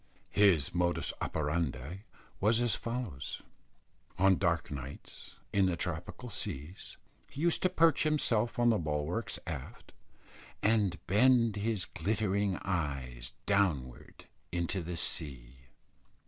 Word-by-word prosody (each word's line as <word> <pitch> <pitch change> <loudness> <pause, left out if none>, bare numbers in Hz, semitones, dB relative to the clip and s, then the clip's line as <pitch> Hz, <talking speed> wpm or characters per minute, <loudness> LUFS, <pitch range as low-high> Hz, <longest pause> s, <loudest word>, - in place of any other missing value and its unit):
His 95 -8 +4
modus 85 0 +1
operandi 75 - -2 0.3
was 110 +3 +4
as 120 -2 +2
follows. 115 - -4 0.7
On 95 +1 +5
dark 85 -5 0
nights 70 0 -8 0.2
in 100 -1 +4
the 90 -2 0
tropical 90 +9 -4
seas, 75 +3 -6 0.3
he 140 - -7
used 170 0 +3
to 185 - +3
perch 165 -4 +4
himself 125 -7 +1
on 120 0 +5
the 110 - +2
bulwarks 80 +7 -2
aft, - - -7 0.7
and 105 -5 +3
bend 115 +2 +4
his 105 -2 0
glittering 100 +1 0
eyes 70 -9 -3
downwards 85 -12 0 0.3
into 85 +2 -1
the 85 0 -5
sea. 65 -8 -5
95 Hz, 115 wpm, -32 LUFS, 75-110 Hz, 0.7 s, On